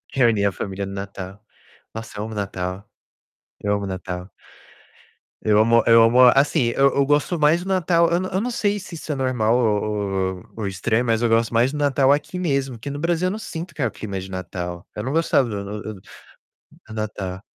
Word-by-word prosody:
Reunir 115 -6 +3
a - - +1
família 100 +1 -4
no 100 - -7
Natal. 100 0 -7 0.5
Nossa, 110 -2 -8
eu - - -2
amo 110 +1 -6
o - - -7
Natal. 95 -1 -4 0.7
Eu 105 - 0
amo 100 - -2
o - - -4
Natal. 90 0 -5 1.1
Eu 105 -1 +3
amo 115 +2 +4
eu 115 -1 +7
amo 115 +2 +4 0.2
assim, 140 0 +3
eu 140 0 +4
eu 140 - +3
gosto 145 +4 +1
mais 155 +4 +3
do 190 - -9
Natal, 170 -3 +3
eu 170 - +2
n 185 - -2
eu 190 - 0
não 250 +3 -2
sei 205 -3 0
se 185 -2 -9
isso 155 0 -6
é - - -1
normal 125 -4 +1
ou 110 -4 +2 0.5
ou 90 - -13
ou 105 -3 -2
estranho, 110 +5 0
mas 115 -1 +1
eu 120 - +3
gosto 115 +1 +2
mais 120 +3 +3
do 150 - -5
Natal 140 -2 +3
aqui 150 +5 0
mesmo, 135 -8 -1
que 130 - -6
no 145 +1 -5
Brasil 170 +2 +1
eu 185 - 0
não 215 - -4
sinto 170 -4 -7
que 150 - -5
é 125 - +3
o - - -5
clima 100 -3 -5
de 95 +1 -8
Natal. 90 -1 -5
Eu 105 - -4
não 130 - -3
gostava 155 -4 +2
do 100 -1 -4 0.2
do 110 - -5
do 95 - -15 0.9
Natal. 100 -4 -4
115 Hz, 220 wpm, -22 LUFS, 100-145 Hz, 1.1 s, eu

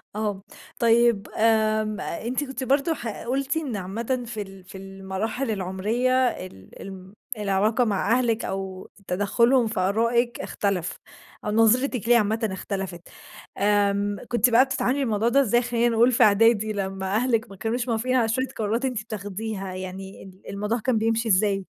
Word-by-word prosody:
آه، 210 -2 -2 0.4
طيّب 235 -2 +3
آمم 215 -1 +2
أنتِ 245 +10 -3
كنتِ 265 -1 -5
برضو 275 +5 +2
ح 240 - -6 0.2
قلتِ 270 +5 -1
إن 285 -8 -3
عامةً 230 +7 -3
في 225 -2 -5
ال 195 -1 -10
في 185 +1 -11
المراحل 195 +6 -4
العمرية 205 +6 -1 0.2
ال 180 - -8
ال 190 0 -10 0.2
العلاقة 210 +4 +1
مع 205 0 0
أهلك 235 -2 0
أو 190 -1 -5 0.2
تدخلهم 235 +6 +2
في 220 -2 -3
أرائِك 230 +5 +1
اختلف، 185 -3 -2 0.5
أو 210 - -1
نظرتِك 225 +2 +2
ليه 240 - +7
عامةً 220 0 0
اختلفت 190 -2 -5 0.6
آمم 205 0 +2
كنتِ 240 +1 +3
بقى 240 +3 +6
بتتعاملي 265 0 0
مع 280 - 0
الموضوع 225 -2 +1
ده 275 +4 +4
إزاي، 240 -1 +3
خلّينا 240 0 +1
نقول 235 +2 +4
في 245 - +4
أعدادي، 215 0 +4
لمّا 190 -1 -3
أهلِك 235 -1 +1
ما 195 - -11
كانوش 230 +5 -2
موافقين 240 +2 0
على 235 -3 +3
شوية 260 +4 0
قرارات 225 +4 -1
أنتِ 250 -5 -2
بتاخديها 205 -2 -5
يعني، 185 +1 -7
ال 190 0 -15
الموضوع 210 +4 -2
كان 240 +1 +1
بيمشي 225 +1 0
إزاي؟ 195 -1 +2
220 Hz, 160 wpm, -25 LUFS, 195-240 Hz, 0.6 s, ليه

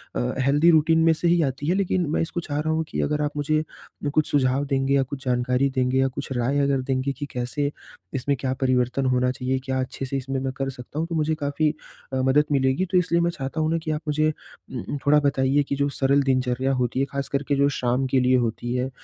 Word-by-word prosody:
अ, - - 0 0.3
healthy 145 +5 +4
routine 160 +1 +4
में 165 - +5
से 165 +2 -1
ही 170 0 +4
आती 140 +1 -3
है, 175 - +2
लेकिन 185 -2 +1
मैं 155 - 0
इसको 170 +1 -2
चाह 145 -3 -3
रहा 155 +1 0
हूँ 160 0 0
कि - - -2
अगर 150 0 0
आप 145 - 0
मुझे 155 +1 +1 0.4
म 145 - 0
कुछ 155 -1 +2
सुझाव 135 0 +2
देंगे 135 -1 0
या 140 - +4
कुछ 135 +1 -8
जानकारी 125 +2 +1
देंगे 130 0 +1
या 135 - +3
कुछ 135 +1 -6
राय 125 +4 +1
अगर 140 -1 +2
देंगे 130 +1 -1
कि 145 - -4
कैसे, 135 +4 -2 0.4
इसमें 140 +1 0
क्या 130 0 -1
परिवर्तन 130 0 +1
होना 125 0 +2
चाहिए? 130 0 -2
क्या 130 0 -2
अच्छे 130 +1 -4
से 135 +1 -2
इसमें 135 0 -3
मैं 135 0 -2
कर 135 0 -1
सकता 130 +3 -7
हूँ? 165 - -1
तो 170 - -4
मुझे 155 0 +1
काफ़ी 145 +1 0 0.4
अ, - - 0
मदद 135 +3 +3
मिलेगी 135 +5 +2
तो 185 - +4
इसलिए 170 -1 +2
मैं 170 - +2
चाहता 135 0 -5
हूँ 155 - +1
ना 165 - +2
कि 155 - -2
आप 150 0 -2
मुझे 155 +1 +2
अ - - +1 0.4
अ, 130 +3 -4
थोड़ा 150 +1 +5
बताइए 140 0 +2
कि 140 - -3
जो 140 +1 +1
सरल 140 0 +2
दिनचर्या 130 0 +1
होती 125 0 -1
है 135 - +2
ख़ास 140 -1 -3
कर 140 0 -1
के 145 - +2
जो 140 +1 +3
शाम 125 +2 0
के 135 - +4
लिए 125 0 +3
होती 120 0 -2
है, 125 +1 -1
140 Hz, 250 wpm, -24 LUFS, 130-150 Hz, 0.4 s, में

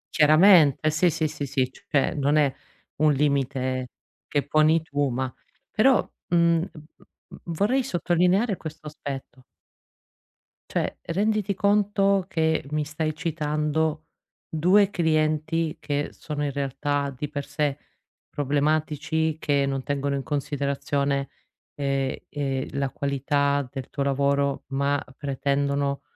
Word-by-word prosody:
Chiaramente 155 -1 +6
sì, 170 +3 +3
sì, 155 0 0
sì, 150 -2 -5
sì, 130 -2 0
cioè, 140 +1 -1
non 145 +1 +1
è 145 -3 +3 0.4
un 155 0 +4
limite 135 -2 0 0.4
che 145 -2 0
poni 155 +1 +3
tu, 145 -3 -1
ma 130 +1 -2 0.4
però, 260 +4 +4 0.2
mhmm, 170 -1 +3
v - - -12 0.2
v - - -21 0.3
v - - -11
vorrei 205 +11 +1
sottolineare 180 +1 +2
questo 155 -2 -9
aspetto 140 -3 -7 1.3
cioè, - - -1
renditi 205 +3 0
conto 200 -1 +2
che 160 -3 +1
mi 150 0 0
stai 155 +1 -2
citando 155 -1 -1 0.4
2 185 +6 +4
clienti 155 -2 0
che 145 0 -2
sono 150 -1 -5
in 140 - -1
realtà 140 +1 -2
di 145 +3 -4
per 145 -1 -4
sé 145 -2 -1 0.5
problematici, 150 +2 0
che 140 -3 +1
non 135 -1 -2
tengono 140 0 -1
in 135 - -3
considerazione, 140 -1 -1 0.5
ehm, 135 -2 -1
ehm, 135 -2 -2
la 140 -1 -1
qualità 140 0 0
del 135 -2 -6
tuo 140 - -2
lavoro, 140 0 +1
ma 140 +1 0
pretendono 140 0 -1
145 Hz, 125 wpm, -25 LUFS, 140-160 Hz, 1.3 s, Chiaramente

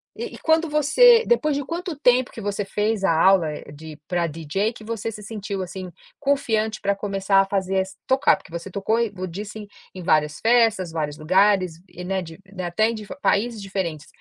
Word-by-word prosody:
E 465 +2 -6
e - - -10
quando 320 0 +2
você 455 - +6
depois 305 -12 +2
de 285 - -2
quanto 345 0 -4
tempo 250 -2 +3
que 225 - -9
você 205 0 -2
fez 210 0 -1
a 180 - +3
aula, 170 0 +4
eh, 145 - -9
de 155 0 -10
pra 175 -2 0
DJ 165 +8 -2
que 220 - -13
você 225 0 -4
se 210 0 -10
sentiu, 205 -2 -5
assim, 185 0 -7 0.3
confiante 225 -6 0
pra 200 0 +1
começar 195 -1 +1
a - - 0
fazer, 195 -1 0
ass 190 0 -7
tocar, 265 +1 +4
porque 165 - -18
você 170 +3 -6
tocou 200 +5 0
e 230 -3 0 0.2
disse 205 +5 -7
em 205 - -9 0.3
em 185 - -7
várias 150 -3 +2
festas, 225 -7 +3
vários 150 -2 -3
lugares 185 0 +2
e, 180 - -9
né, 190 +1 -1
de 165 0 -10 0.2
até 185 +5 +1
em 230 - -3
di 210 -2 -8
países 220 +1 +1
diferentes. 185 -6 -4
200 Hz, 205 wpm, -23 LUFS, 180-230 Hz, 0.3 s, você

